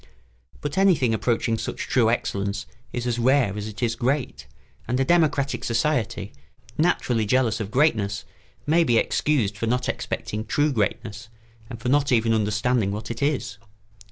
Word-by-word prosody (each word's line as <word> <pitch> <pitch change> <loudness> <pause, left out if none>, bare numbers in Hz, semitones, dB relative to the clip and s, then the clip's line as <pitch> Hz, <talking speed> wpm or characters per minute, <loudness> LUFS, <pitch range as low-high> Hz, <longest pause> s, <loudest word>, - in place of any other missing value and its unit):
But 145 +5 -2
anything 165 -12 +4
approaching 115 0 0
such - - -4
true 115 -4 +3
excellence 100 -3 -2 0.3
is 120 -1 -3
as 120 -1 -1
rare 125 -4 +3
as 105 0 -4
it 110 +2 -6
is 115 -1 +1
great, 120 - -2 0.4
and 125 +2 0
a 135 - +2
democratic 145 -4 +2
society, 115 -5 -1 0.4
naturally 130 -8 +1
jealous 115 0 +1
of 105 -2 -4
greatness, 105 -8 +1 0.4
may 165 +3 +4
be 120 -7 +2
excused 115 -6 +1
for 115 +2 -3
not 125 +2 0
expecting 105 +1 -3
true 145 +6 +1
greatness 110 -1 -2 0.4
and 115 - -7
for 125 - -2
not 140 +1 +2
even 115 -2 +3
understanding 110 0 +1
what 105 +2 -5
it 115 - -6
is. 140 -1 -1
120 Hz, 155 wpm, -24 LUFS, 110-135 Hz, 0.4 s, anything